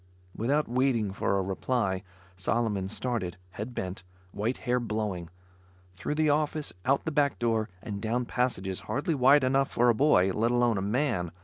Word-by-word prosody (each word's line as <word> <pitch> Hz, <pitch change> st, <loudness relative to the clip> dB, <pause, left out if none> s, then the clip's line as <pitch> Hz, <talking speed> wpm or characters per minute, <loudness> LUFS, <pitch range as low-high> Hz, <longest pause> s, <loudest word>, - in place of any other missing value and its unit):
Without 140 Hz, +7 st, +1 dB
waiting 120 Hz, -5 st, +1 dB
for 100 Hz, -, 0 dB
a 95 Hz, -, 0 dB
reply, 95 Hz, 0 st, -1 dB, 0.3 s
Solomon 100 Hz, 0 st, 0 dB
started, 110 Hz, -4 st, -3 dB
head 110 Hz, +5 st, -6 dB
bent, 95 Hz, 0 st, -4 dB, 0.3 s
white 110 Hz, +7 st, -2 dB
hair 125 Hz, 0 st, +2 dB
blowing; 105 Hz, -7 st, -3 dB, 0.7 s
through 90 Hz, -, -3 dB
the 155 Hz, -1 st, +3 dB
office, 150 Hz, 0 st, 0 dB
out 135 Hz, +1 st, +2 dB
the 160 Hz, -, -1 dB
back 145 Hz, -2 st, +2 dB
door 115 Hz, -2 st, 0 dB
and 100 Hz, -2 st, -5 dB
down 120 Hz, +2 st, 0 dB
passages 100 Hz, -8 st, -1 dB
hardly 140 Hz, +9 st, 0 dB
wide 135 Hz, +1 st, +5 dB
enough 135 Hz, +1 st, +2 dB
for 120 Hz, +1 st, +3 dB
a -, -, +6 dB
boy, 110 Hz, -8 st, +4 dB
let 115 Hz, +4 st, +1 dB
alone 120 Hz, -3 st, +2 dB
a -, -, -2 dB
man. 105 Hz, -, 0 dB
120 Hz, 170 wpm, -28 LUFS, 100-130 Hz, 0.7 s, a